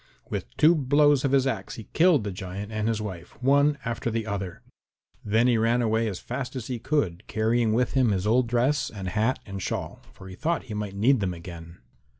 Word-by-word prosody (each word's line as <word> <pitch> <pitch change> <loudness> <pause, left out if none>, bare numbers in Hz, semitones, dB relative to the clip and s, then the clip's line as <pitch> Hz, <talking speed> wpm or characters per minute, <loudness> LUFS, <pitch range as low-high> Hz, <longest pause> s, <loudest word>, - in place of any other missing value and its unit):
With - - -5
two 160 +3 +6
blows 145 -1 +3
of 135 - +1
his 135 -1 +3
axe 110 -8 -3
he 110 - -8
killed 165 - +4
the 100 - -3
giant 95 +2 -6
and 110 0 -1
his 115 -1 0
wife, 90 -5 -8
one 140 +3 +3
after 115 0 -2
the 115 -1 -2
other. 100 -4 -5 0.6
Then 110 +3 +2
he 120 -3 +3
ran 120 +2 +2
away 110 0 +1
as 100 -4 -3
fast 125 +5 -5
as 125 -4 -4
he 125 -1 -4
could, 115 - -1
carrying 115 +1 +1
with 120 +3 +1
him 130 -3 +3
his 95 -2 0
old 120 +3 +3
dress 125 +3 +1
and 95 -3 -5
hat 110 +6 +1
and 100 -2 -6
shawl, - - -4
for 95 - -13
he 95 - -9
thought 160 - -1
he 115 - -8
might 105 -2 -4
need 120 +6 +3
them 95 -3 -1
again. 85 -2 -10
115 Hz, 215 wpm, -26 LUFS, 100-130 Hz, 0.6 s, two